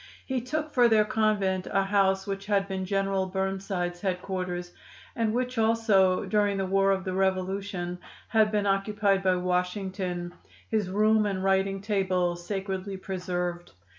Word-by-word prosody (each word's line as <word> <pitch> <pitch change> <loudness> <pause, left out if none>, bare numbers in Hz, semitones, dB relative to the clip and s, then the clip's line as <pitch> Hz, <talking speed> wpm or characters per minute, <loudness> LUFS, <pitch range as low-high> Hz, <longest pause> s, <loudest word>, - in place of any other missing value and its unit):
He 260 -2 -1
took 305 +5 -3
for 245 -2 +5
their 220 -2 +4
convent 210 -4 +1
a 195 - +2
house 195 -1 +2
which 195 0 -5
had 200 -2 +1
been 190 -1 -3
General 195 0 0
Burnsides' 190 -2 -2
headquarters, 180 -2 -3 0.4
and 225 -2 +1
which 250 +1 -1
also, 220 -5 +3
during 205 -2 +1
the 195 - 0
war 195 +1 +2
of 190 -1 +1
the 185 -1 -3
Revolution, 190 -1 -1 0.3
had 220 -2 +3
been 210 -1 +1
occupied 195 0 +1
by 185 -1 +2
Washington, 180 0 -2 0.4
his 215 -4 0
room 215 +2 +3
and 190 -2 -2
writing 195 0 +1
table 185 -4 +1
sacredly 190 +2 -4
preserved. 180 -2 -4
195 Hz, 145 wpm, -27 LUFS, 185-205 Hz, 0.4 s, for